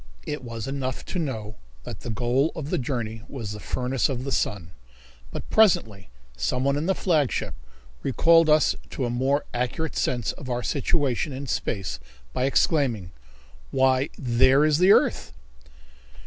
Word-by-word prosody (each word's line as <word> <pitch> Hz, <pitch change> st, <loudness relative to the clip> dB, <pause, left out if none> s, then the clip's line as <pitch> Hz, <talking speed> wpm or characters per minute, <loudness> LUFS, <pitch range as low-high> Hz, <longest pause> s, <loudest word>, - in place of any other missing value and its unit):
It 150 Hz, -3 st, -4 dB
was 115 Hz, -1 st, -6 dB
enough 135 Hz, -2 st, -3 dB
to 185 Hz, -, -1 dB
know 110 Hz, -9 st, -4 dB, 0.3 s
that -, -, -7 dB
the -, -, -7 dB
goal 120 Hz, +7 st, +1 dB
of 155 Hz, -2 st, -5 dB
the -, -, +1 dB
journey 115 Hz, -4 st, -3 dB
was 115 Hz, -7 st, -6 dB
the 105 Hz, -, -6 dB
furnace 125 Hz, +3 st, -1 dB
of 130 Hz, -2 st, -3 dB
the 135 Hz, -, -4 dB
sun. 90 Hz, -9 st, -1 dB, 0.6 s
But -, -, -7 dB
presently 110 Hz, -, +3 dB, 0.3 s
someone 125 Hz, -, 0 dB
in 150 Hz, +4 st, -2 dB
the 190 Hz, -, +2 dB
flagship 155 Hz, -, 0 dB, 0.5 s
recalled 165 Hz, +4 st, +4 dB
us 150 Hz, 0 st, +4 dB
to 130 Hz, -, -3 dB
a 120 Hz, -, -2 dB
more 135 Hz, +4 st, +1 dB
accurate 125 Hz, +5 st, -2 dB
sense 120 Hz, -3 st, 0 dB
of 130 Hz, -, -9 dB
our 120 Hz, 0 st, -2 dB
situation 140 Hz, -2 st, 0 dB
in 135 Hz, +2 st, -5 dB
space 95 Hz, -, -3 dB, 0.3 s
by 125 Hz, -, 0 dB
exclaiming: 130 Hz, -, +1 dB, 0.6 s
"Why, 130 Hz, +1 st, +2 dB
there 130 Hz, +3 st, +4 dB
is 155 Hz, 0 st, +3 dB
the 185 Hz, +2 st, +6 dB
earth!" -, -, +3 dB
130 Hz, 155 wpm, -25 LUFS, 120-145 Hz, 0.6 s, the